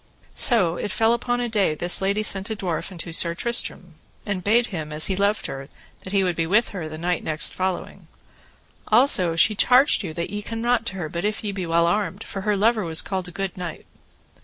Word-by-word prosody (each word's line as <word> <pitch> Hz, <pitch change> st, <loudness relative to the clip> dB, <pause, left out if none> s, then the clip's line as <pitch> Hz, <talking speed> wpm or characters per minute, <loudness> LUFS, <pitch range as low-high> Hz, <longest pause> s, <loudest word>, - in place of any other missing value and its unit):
So 185 Hz, -9 st, +3 dB
it -, -, -4 dB
fell 225 Hz, +3 st, +2 dB
upon 245 Hz, +1 st, -1 dB
a 240 Hz, -, -1 dB
day 205 Hz, -8 st, +1 dB
this 175 Hz, +4 st, +2 dB
lady 200 Hz, +2 st, 0 dB
sent 195 Hz, -1 st, +1 dB
a 220 Hz, -, -2 dB
dwarf 180 Hz, -2 st, -4 dB
unto 170 Hz, -2 st, -3 dB
Sir 170 Hz, +1 st, +4 dB
Tristram, 185 Hz, -6 st, 0 dB, 0.3 s
and 195 Hz, -4 st, -3 dB
bade 230 Hz, +5 st, +3 dB
him, 155 Hz, -3 st, -5 dB
as 150 Hz, +1 st, 0 dB
he 190 Hz, -, 0 dB
loved 200 Hz, +2 st, 0 dB
her, 135 Hz, +1 st, -7 dB, 0.3 s
that 185 Hz, -, -8 dB
he 195 Hz, -1 st, +2 dB
would 180 Hz, -2 st, -1 dB
be 165 Hz, 0 st, -1 dB
with 215 Hz, +6 st, +2 dB
her 175 Hz, -6 st, -6 dB
the 155 Hz, -, -7 dB
night 175 Hz, +1 st, -2 dB
next 155 Hz, -1 st, +2 dB
following. 185 Hz, -1 st, -4 dB, 0.8 s
Also 215 Hz, -8 st, +3 dB
she 215 Hz, +6 st, +4 dB
charged 250 Hz, +6 st, +4 dB
you 180 Hz, -6 st, -5 dB
that 170 Hz, -, -4 dB
ye 205 Hz, 0 st, -4 dB
come 225 Hz, +2 st, -6 dB
not 235 Hz, 0 st, 0 dB
to 190 Hz, -, -4 dB
her 175 Hz, -4 st, -4 dB
but 170 Hz, +3 st, -5 dB
if 210 Hz, +1 st, -2 dB
ye 210 Hz, -, -2 dB
be 190 Hz, -3 st, -5 dB
well 170 Hz, 0 st, +2 dB
armed, 200 Hz, +3 st, -1 dB
for 195 Hz, -, -6 dB
her 210 Hz, +1 st, 0 dB
lover 220 Hz, +1 st, +2 dB
was 160 Hz, -2 st, -1 dB
called 190 Hz, -2 st, -4 dB
a -, -, -9 dB
good 195 Hz, 0 st, -4 dB
knight. 175 Hz, -3 st, -7 dB
190 Hz, 230 wpm, -23 LUFS, 170-215 Hz, 0.8 s, Sir